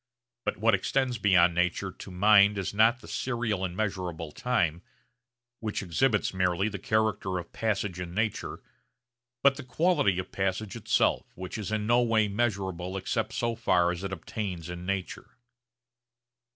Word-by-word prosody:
But - - -1
what 115 +2 +3
extends 125 +4 0
beyond 90 -4 +5
nature 90 +2 0
to 95 - -11
mind 100 +2 +5
is 95 0 -3
not 115 +4 +4
the - - -12
serial 115 -6 -2
and 90 -1 -3
measurable 90 -6 -3
time, 85 -6 0 0.8
which 110 -2 -3
exhibits 105 +5 +1
merely 95 +2 +1
the 100 -2 -6
character 110 -3 0
of 90 - -7
passage 100 -4 -1
in 90 -1 -6
nature, 110 0 -2 0.8
but 140 -1 +5
the 145 - -6
quality 125 - +2
of 95 0 -4
passage 95 +1 -2
itself - - +1
which 90 0 -7
is 110 -1 -4
in 110 -1 -1
no 120 +2 +4
way 110 -3 +3
measurable 95 -4 -2
except 110 +3 -2
so 120 -1 0
far 90 -6 +2
as 90 +1 -5
it 95 - -3
obtains 95 -3 -5
in 90 0 -7
nature. 95 -2 -4
100 Hz, 155 wpm, -28 LUFS, 90-110 Hz, 0.8 s, beyond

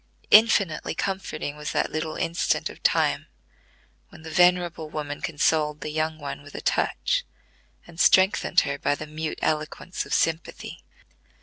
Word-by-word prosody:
Infinitely 210 -7 +4
comforting 190 -6 -3
was 150 0 -5
that - - 0
little 155 0 -3
instant 170 +1 -1
of - - -15
time, - - +1 0.8
when - - -15
the 160 - -8
venerable 175 -2 +2
woman 145 -1 -5
consoled 150 -1 0
the 150 - -4
young 155 +1 -1
one 145 -2 -6
with 145 0 -14
a - - -4
touch, - - 0 0.6
and 170 -1 -14
strengthened 190 +2 +4
her 140 -1 -3
by 145 - +1
the 155 - -7
mute 155 +1 -5
eloquence 155 +3 -2
of - - -13
sympathy. 165 0 -2
155 Hz, 145 wpm, -25 LUFS, 150-175 Hz, 0.8 s, Infinitely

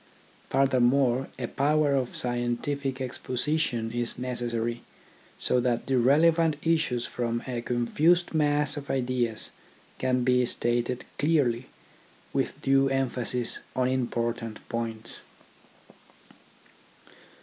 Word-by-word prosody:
Furthermore, 130 -1 +3
a 125 - -3
power 145 +3 +2
of 130 -3 -1
scientific 125 +3 -1
expo 130 -1 -5
sition 125 -6 0
is 120 -1 -1
necessary, 120 -2 -2 0.6
so 125 - +1
that 120 -1 0
the 130 -2 +2
relevant 160 +5 +4
issues 155 -7 +1
from 120 -1 -2
a 125 -2 -3
confused 150 +10 +2
mass 150 -1 +1
of 140 -1 -7
ideas 125 -3 -1 0.5
can 130 -1 +1
be 125 0 +3
stated 120 +1 -1
clearly, 135 -6 +2 0.7
with - - -1
due 135 0 +4
emphasis 125 -2 0 0.2
on 130 0 +2
important 120 -3 -2
points. 115 -1 -2
125 Hz, 105 wpm, -27 LUFS, 120-140 Hz, 0.7 s, relevant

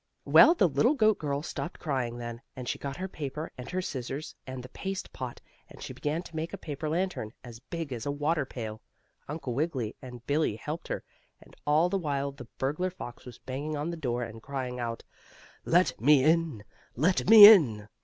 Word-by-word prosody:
Well, 335 - +7
the 190 - +4
little 240 - +2
goat 215 -5 +3
girl 145 -1 -2
stopped 170 +1 -5
crying 130 -6 -2
then, 120 0 -6
and 125 -2 -7
she - - -2
got 140 -1 -5
her 185 +1 -3
paper, 155 -2 -6
and 125 - -8
her 185 +1 -2
scissors, 135 -1 -5
and 130 -1 -6
the 125 - -10
paste 195 0 -5
pot, 125 -2 -6 0.3
and - - -14
she - - -7
began 155 +4 -2
to 170 - -12
make 160 +1 -4
a - - -4
paper 150 0 -5
lantern, 170 - -2
as 120 -3 -10
big 155 +2 -5
as 120 +3 -5
a - - 0
water 150 +2 0
pail. 110 -4 -7 0.5
Uncle 145 -4 -4
Wiggily 135 -5 -2
and 125 -3 -10
Billie 145 -6 +1
helped 150 +9 -6
her. - - -4 0.4
And - - -18
all 155 +4 +4
the 195 +2 -1
while 140 -4 -2
the 135 -4 -11
burglar 150 +8 -1
fox 150 -9 -10
was 125 -3 -10
banging 145 +4 -4
on 150 +4 -2
the - - -4
door, 125 -6 -2
and 115 -1 -8
crying 130 -1 -4
out: 115 -1 -4 0.6
"Let 175 -6 +2
me 140 +1 +6
in! 160 -7 +2 0.3
Let 175 +8 +1
me 220 -2 +12
in!" 130 - +7
145 Hz, 205 wpm, -29 LUFS, 125-165 Hz, 0.6 s, me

